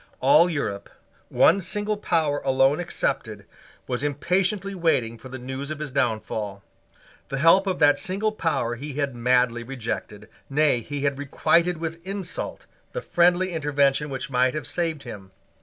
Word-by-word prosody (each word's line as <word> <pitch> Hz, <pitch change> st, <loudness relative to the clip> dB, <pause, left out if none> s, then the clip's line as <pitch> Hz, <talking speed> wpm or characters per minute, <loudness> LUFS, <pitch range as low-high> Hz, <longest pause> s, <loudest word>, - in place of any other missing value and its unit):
All 150 Hz, +6 st, +5 dB
Europe, 100 Hz, -, -3 dB, 0.4 s
one 195 Hz, -, +4 dB
single 210 Hz, +3 st, -1 dB
power 160 Hz, -7 st, 0 dB
alone 135 Hz, +2 st, +3 dB
excepted, 175 Hz, -, -2 dB, 0.4 s
was 125 Hz, -1 st, -3 dB
impatiently 185 Hz, +7 st, 0 dB
waiting 140 Hz, -11 st, 0 dB
for 130 Hz, -, -11 dB
the 130 Hz, -, -6 dB
news 130 Hz, +3 st, -6 dB
of 155 Hz, -, -4 dB
his 150 Hz, -2 st, -5 dB
downfall. 110 Hz, -5 st, -2 dB, 0.7 s
The 135 Hz, -, -3 dB
help 165 Hz, +7 st, +5 dB
of 185 Hz, -, 0 dB
that 145 Hz, -1 st, +4 dB
single 200 Hz, +4 st, -1 dB
power 165 Hz, -, -1 dB
he 140 Hz, +4 st, -6 dB
had 140 Hz, -2 st, -2 dB
madly 125 Hz, 0 st, +2 dB
rejected. 115 Hz, -4 st, -5 dB, 0.2 s
Nay, 145 Hz, -2 st, +3 dB
he 145 Hz, +4 st, -5 dB
had 140 Hz, -1 st, 0 dB
requited 170 Hz, +5 st, +2 dB
with 165 Hz, +1 st, -5 dB
insult 190 Hz, -1 st, -5 dB, 0.3 s
the -, -, -3 dB
friendly 175 Hz, +1 st, +2 dB
intervention 145 Hz, -2 st, +1 dB
which 135 Hz, 0 st, -5 dB
might 125 Hz, +2 st, +2 dB
have 150 Hz, -, -4 dB
saved 165 Hz, -5 st, -2 dB
him. 100 Hz, -6 st, -9 dB
145 Hz, 155 wpm, -24 LUFS, 130-170 Hz, 0.7 s, All